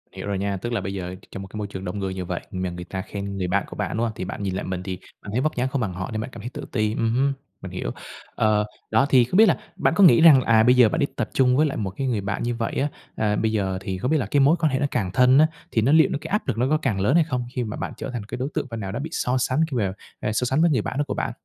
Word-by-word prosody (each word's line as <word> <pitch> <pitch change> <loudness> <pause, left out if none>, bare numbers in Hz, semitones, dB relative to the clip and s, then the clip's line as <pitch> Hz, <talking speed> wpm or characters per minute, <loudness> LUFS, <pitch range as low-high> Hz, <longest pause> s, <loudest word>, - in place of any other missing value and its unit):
Hiểu - - -6
rồi 100 -1 -1
nha. 100 0 -1
Tức 120 +5 -4
là 100 - 0
bây 95 +1 -4
giờ, 90 -1 -5 0.2
trong 95 - -6
một - - -9
cái 105 - -9
môi 105 -1 -3
trường 95 -1 -7
đông 90 +3 -4
người 95 -1 -2
như 95 -1 -4
vậy, 85 0 -3
mà 90 -1 -2
người 90 0 -7
ta 95 +1 -4
khen 100 -1 -6
người 90 - -1
bạn 100 +2 +1
của - - -9
bạn, - - -3
đúng 115 - +1
hông? 115 - -1
Thì - - -4
bạn 100 +2 -5
nhìn 95 -1 -2
lại - - -3
mình, 90 -1 -4
thì 95 -1 -4 0.2
bạn 100 - -8
thấy 125 +4 0
vóc 155 +1 0
dáng 125 +1 0
không 130 -1 -2
bằng 95 -5 -2
họ, 90 +1 -5
nên 110 0 -2
bạn 120 - -5
cảm 115 - -8
thấy 120 - -5
tự - - -7
ti. 110 0 0
Ừm 115 0 0
hứm, 140 +2 +2 0.3
mình - - -7
hiểu. - - -4 0.4
Ờ, 105 -1 +2 0.3
đó, 115 +5 +4
thì 125 -3 +6
không 180 - -1
biết 220 - +8
là - - +3 0.2
bạn - - +1
có 200 - +6
nghĩ 160 -5 +7
rằng, 150 -6 +8
à, 110 -2 +4
bây 125 +2 +5
giờ 125 -3 +6
bạn 165 - -1
đi 140 - +3
tập - - -2
chung 125 -1 +3
với 155 - +4
lại - - -3
một 100 -3 -2
cái 135 - -1
người 110 -5 0
bạn 100 +3 -3
như 120 0 -1
vậy 115 -1 -3
á, 140 - +1 0.3
à, 105 -1 +1
bây 110 +1 0
giờ 95 -3 -1
thì 95 -1 -4
không 125 +10 -2
biết 160 - +4
là 125 - -1
cái 140 +8 +1
mối 145 +5 +5
quan 155 -4 +2
hệ 130 - 0
nó 145 - +1
càng 95 -7 -1
thân 130 +4 +5
á, 155 - +6 0.2
thì 110 - +2
nó 130 +6 +3
liệu 160 -3 +6
cái - - -7
áp 210 - 0
lực 120 -5 -1
nó 125 +2 +2
có 155 - +3
càng 120 -10 -1
lớn 115 - +2
hay 170 - +6
không, 125 -5 -3
khi 125 - 0
mà 105 - -5
bạn - - -4
trở - - -5
thành 120 -4 -4
cái 110 - -6
đối 130 +3 -2
tượng 150 -4 -2
phần 115 -1 -5
nào 95 -2 -4
đó 115 - -4
bị 155 +3 -4
so 125 +1 0
sánh 130 +3 0
khi 125 - -1
mà, 95 -4 0 0.3
ờ, 105 - -2
so 125 +3 0
sánh 135 +5 +1
với 170 - +5
người 125 -7 +2
bạn 130 - -4
đó 145 - +2
của - - -2
bạn? - - -2
115 Hz, 355 wpm, -24 LUFS, 100-130 Hz, 0.4 s, biết